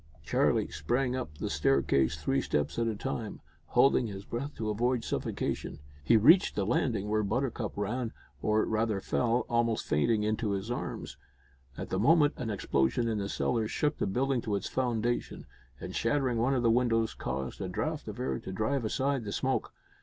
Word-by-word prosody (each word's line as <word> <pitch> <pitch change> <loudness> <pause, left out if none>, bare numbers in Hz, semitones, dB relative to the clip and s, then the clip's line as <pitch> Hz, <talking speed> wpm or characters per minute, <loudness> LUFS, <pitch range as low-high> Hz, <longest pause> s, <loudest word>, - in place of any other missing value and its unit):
Charlie - - +2
sprang 120 - 0
up 75 -12 -5
the - - -3
staircase 70 -1 +2
three 70 - +1
steps 75 +8 -1
at 115 - +1
a 110 - -1
time, 115 -1 -4 0.3
holding 125 +1 +4
his 100 -1 -7
breath 135 +5 -4
to 110 -1 -2
avoid 120 +2 0
suffocation. - - -3 0.3
He 115 +9 +5
reached 165 - +6
the 100 - 0
landing, 110 -2 0
where 110 +1 +1
Buttercup 115 +1 -1
ran, 115 +3 -2 0.3
or, 110 0 +2
rather, 110 -2 0
fell, 120 +4 0
almost 115 -1 +1
fainting, 105 +8 +2
into 110 0 0
his 100 +4 -3
arms. 120 - -5 0.6
At - - -5
the 95 - -1
moment 145 +5 +5
an 120 - -3
explosion 100 - +1
in 110 -2 0
the 100 0 -3
cellar 115 0 0
shook 150 +6 -1
the - - 0
building 130 +5 0
to 105 -3 -1
its 100 - -2
foundation, 120 -2 -1 0.3
and, - - -7
shattering 130 -5 +1
one 130 +4 +2
of 125 - 0
the 115 - +4
windows, 115 -2 +2
caused 65 +1 -4
a - - -3
draught - - -3
of - - -6
air 65 -1 -1
to - - -7
drive 115 +7 -1
aside 135 +3 0
the 100 - -5
smoke. - - -1
115 Hz, 185 wpm, -30 LUFS, 100-125 Hz, 0.6 s, reached